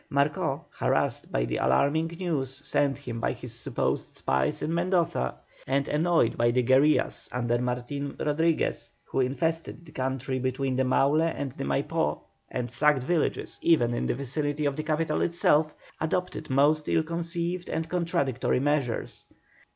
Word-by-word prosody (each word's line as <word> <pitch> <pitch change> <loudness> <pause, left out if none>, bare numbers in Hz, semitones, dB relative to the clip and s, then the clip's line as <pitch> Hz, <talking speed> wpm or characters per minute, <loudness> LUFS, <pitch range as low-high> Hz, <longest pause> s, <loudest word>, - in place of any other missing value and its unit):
Marcó, 145 +2 0
harassed - - 0
by - - +1
the - - -2
alarming 145 - +2
news 160 -8 -1
sent 140 0 0
him 125 -5 -6
by - - 0
his - - -9
supposed - - -2
spies 65 -1 0
in 160 - -1
Mendoza, 170 - +1 0.3
and 140 +1 +1
annoyed 160 -5 +2
by 120 0 +3
the 125 +1 +2
guerillas 135 +5 +3
under 120 -1 0
Martin 125 +3 -3
Rodriguez, 160 +2 0
who - - -2
infested 165 +6 -1
the 155 - -13
country 130 0 -2
between 130 +1 -1
the 130 - +2
Maule 140 +4 +3
and 160 -4 -1
the - - -5
Maipó, 70 0 0 0.3
and 125 -1 -3
sacked 140 +1 +3
villages 165 +2 -1
even 125 -8 +3
in 120 - -1
the - - 0
vicinity 145 +3 -2
of 140 -1 +1
the 155 - -2
capital 155 0 0
itself, 155 -2 +2 0.2
adopted 180 +3 -2
most 145 +3 +3
ill 160 - +3
conceived 170 +2 -3
and 160 0 -2
contradictory 150 -8 0
measures. 140 -4 -1
145 Hz, 150 wpm, -27 LUFS, 130-160 Hz, 0.3 s, by